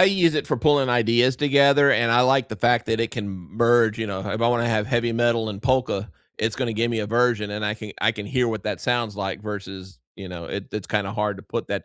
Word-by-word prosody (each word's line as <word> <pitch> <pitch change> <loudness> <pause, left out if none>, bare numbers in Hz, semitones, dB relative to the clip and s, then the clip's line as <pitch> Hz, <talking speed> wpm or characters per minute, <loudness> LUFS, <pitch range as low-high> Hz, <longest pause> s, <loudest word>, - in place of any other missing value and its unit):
I - - +9
use 180 -5 +3
it - - -1
for - - 0
pulling 145 -4 +3
ideas 120 +2 +3
together, 140 0 +4
and 115 -2 +3
I 120 - +5
like 130 -1 +3
the 110 - -6
fact 120 0 +2
that 115 0 0
it 115 - -1
can 110 -4 -5
m 95 -3 -8
merge, 115 -2 +3
you 110 - -2
know, 95 -1 -5
ha 100 0 -4
if 110 +2 -3
I 115 - +4
wanna 120 -1 +1
have 110 -2 0
heavy 120 -2 0
metal 115 -1 +1
and 100 -1 -6
polka, 130 -6 0 0.4
it's 110 0 -1
gonna 120 -4 -3
give 115 +2 0
me 115 - -2
a 105 - -2
version, 115 -2 +1
and 105 +1 -4
I 105 - 0
can 110 -2 -9
I 110 +2 +3
can 105 -2 -7
hear 125 +1 0
what 110 -4 -3
that - - -3
sounds 120 -4 -1
like 95 -1 -4
versus, 95 -5 -8 0.2
you 95 -2 -9
know 85 -2 -8
it 100 +3 -6
it's 105 -3 -5
kinda 100 -1 -2
hard 105 -2 -2
to - - -11
put - - -5
that - - -3
115 Hz, 275 wpm, -23 LUFS, 105-120 Hz, 0.4 s, I